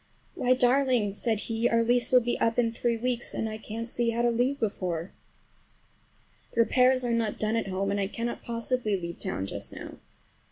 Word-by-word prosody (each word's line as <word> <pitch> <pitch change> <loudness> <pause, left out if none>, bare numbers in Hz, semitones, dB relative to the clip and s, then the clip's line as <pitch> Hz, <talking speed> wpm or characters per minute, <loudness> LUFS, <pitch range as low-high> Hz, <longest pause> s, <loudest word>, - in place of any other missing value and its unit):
"Why 255 +1 +2
darling!" 250 -4 +2
said 220 0 -1
he, 230 +1 0
"our 230 0 +3
lease 240 0 +2
will 250 -1 +7
be 240 +1 -1
up 230 0 +1
in 235 -2 +2
three 235 0 -1
weeks, 240 0 -2
and 225 - -1
I 215 0 -5
can't 225 +1 -6
see 235 -1 0
how 230 +1 0
to 240 - +3
leave 250 +4 0
before. 185 -5 -2 1.4
"The 230 - +4
repairs 255 +2 +4
are 240 - 0
not 225 -2 0
done 215 +1 0
at 225 - -1
home, 195 +1 -1
and 200 - 0
I 195 - 0
cannot 230 +3 -4
possibly 230 -3 -1
leave 170 -1 -6
town 95 - -3
just - - -6
now. - - -9
230 Hz, 200 wpm, -28 LUFS, 215-245 Hz, 1.4 s, will